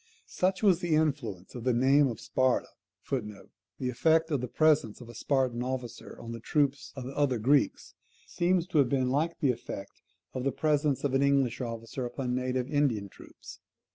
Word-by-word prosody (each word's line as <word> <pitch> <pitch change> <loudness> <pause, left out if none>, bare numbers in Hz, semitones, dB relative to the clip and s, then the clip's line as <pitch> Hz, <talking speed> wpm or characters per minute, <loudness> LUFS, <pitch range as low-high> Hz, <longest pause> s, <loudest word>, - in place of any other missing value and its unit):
Such 190 +3 -1
was 190 -5 +5
the 170 -3 +1
influence 135 - -1
of 120 - -7
the 125 -1 +2
name 135 +4 +4
of 115 -4 -5
Sparta, 130 -1 +1 0.4
[The 105 -7 -3 0.4
effect 160 +6 +2
of 140 -4 +1
the 125 - -3
presence 150 -5 +2
of 120 -2 -11
a - - -9
Spartan 125 0 0
officer 125 -2 -5
on 115 - -8
the 115 - -6
troops 140 +3 0
of 135 - -6
the 130 +2 -7
other 140 -4 +2
Greeks, 130 +1 +1 0.3
seems 175 0 +1
to 155 - +2
have 135 -4 +4
been 130 -2 +1
like 160 +5 0
the 140 -4 +4
effect 115 -4 -8 0.3
of 130 - -3
the 135 - +1
presence 150 -2 +1
of 140 -2 0
an 135 - +3
English 140 -3 +2
officer 115 +1 -5
upon 125 0 -3
native 125 0 -1
Indian 130 -10 0
troops. - - -13
130 Hz, 185 wpm, -29 LUFS, 120-145 Hz, 0.4 s, was